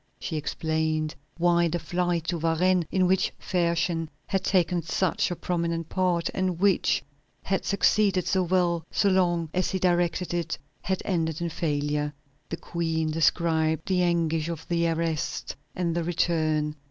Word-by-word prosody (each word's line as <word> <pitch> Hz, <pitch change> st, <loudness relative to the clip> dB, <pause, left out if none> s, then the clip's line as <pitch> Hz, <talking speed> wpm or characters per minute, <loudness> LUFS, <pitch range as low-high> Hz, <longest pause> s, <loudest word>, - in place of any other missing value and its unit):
She 160 Hz, -, -4 dB
explained 155 Hz, +1 st, -1 dB, 0.2 s
why 170 Hz, 0 st, +3 dB
the 170 Hz, +1 st, -1 dB
flight 175 Hz, +1 st, -1 dB
to 170 Hz, -1 st, -1 dB
Varennes, 170 Hz, +2 st, +2 dB
in 185 Hz, -1 st, +3 dB
which 185 Hz, +1 st, +2 dB
Fersen 170 Hz, -2 st, 0 dB, 0.2 s
had 195 Hz, -, -1 dB
taken 180 Hz, -2 st, +2 dB
such 175 Hz, +2 st, 0 dB
a 175 Hz, -, -2 dB
prominent 170 Hz, -2 st, -2 dB
part, 180 Hz, -3 st, +1 dB
and 185 Hz, -3 st, -1 dB
which 195 Hz, -1 st, +2 dB, 0.4 s
had 195 Hz, 0 st, -1 dB
succeeded 200 Hz, -2 st, +2 dB
so 190 Hz, -, +2 dB
well 175 Hz, -2 st, +1 dB
so 200 Hz, -, +2 dB
long 175 Hz, -4 st, +1 dB
as 185 Hz, -1 st, +1 dB
he 190 Hz, -, -1 dB
directed 175 Hz, -1 st, +1 dB
it, 170 Hz, -1 st, -2 dB, 0.2 s
had 190 Hz, 0 st, -2 dB
ended 160 Hz, -4 st, -1 dB
in 170 Hz, 0 st, -2 dB
failure. 150 Hz, -2 st, -1 dB, 0.4 s
The 165 Hz, -, -3 dB
Queen 160 Hz, -2 st, -2 dB
described 160 Hz, 0 st, +1 dB
the 185 Hz, -2 st, +2 dB
anguish 165 Hz, -2 st, +1 dB
of 165 Hz, -2 st, -6 dB
the 170 Hz, -1 st, +1 dB
arrest 165 Hz, -1 st, -2 dB, 0.2 s
and 170 Hz, -2 st, 0 dB
the 170 Hz, -, 0 dB
return. 155 Hz, -3 st, 0 dB
170 Hz, 155 wpm, -26 LUFS, 160-180 Hz, 0.4 s, why